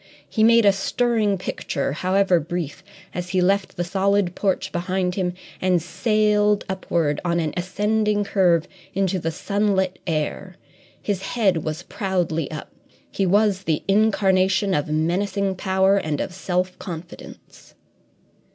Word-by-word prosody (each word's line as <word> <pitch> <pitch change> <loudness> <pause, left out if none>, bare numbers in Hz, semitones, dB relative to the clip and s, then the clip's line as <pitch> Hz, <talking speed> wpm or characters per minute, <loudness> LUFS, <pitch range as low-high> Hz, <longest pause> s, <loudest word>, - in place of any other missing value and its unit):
He 220 - 0
made 230 0 +6
a 200 - +7
stirring 210 +1 0
picture, 145 -6 -3
however 185 +3 +2
brief, 165 -1 -5 0.3
as 180 0 -4
he 185 0 +1
left 195 +2 +1
the 175 - 0
solid 195 0 +1
porch 190 -1 -1
behind 180 +1 -1
him 180 -2 -2 0.3
and 185 -1 +3
sailed 210 +3 +1
upward 170 -6 -1
on 170 -1 +1
an 155 -3 -1
ascending 210 +3 0
curve 180 -5 +2 0.3
into 190 -1 +1
the 165 - -2
sunlit 190 +1 0
air. 165 +4 -2 0.4
His 200 -3 -2
head 195 -5 +1
was 155 -1 -4
proudly 175 -6 -2
up; 155 -1 -7 0.4
he 195 - 0
was 200 0 +3
the 155 -2 0
incarnation 195 -2 +3
of 145 -4 0
menacing 190 +5 0
power 190 +1 +2
and 155 -6 -2
of 185 - -3
self 180 0 -2
confidence. 170 -1 -10
190 Hz, 135 wpm, -22 LUFS, 175-200 Hz, 0.4 s, a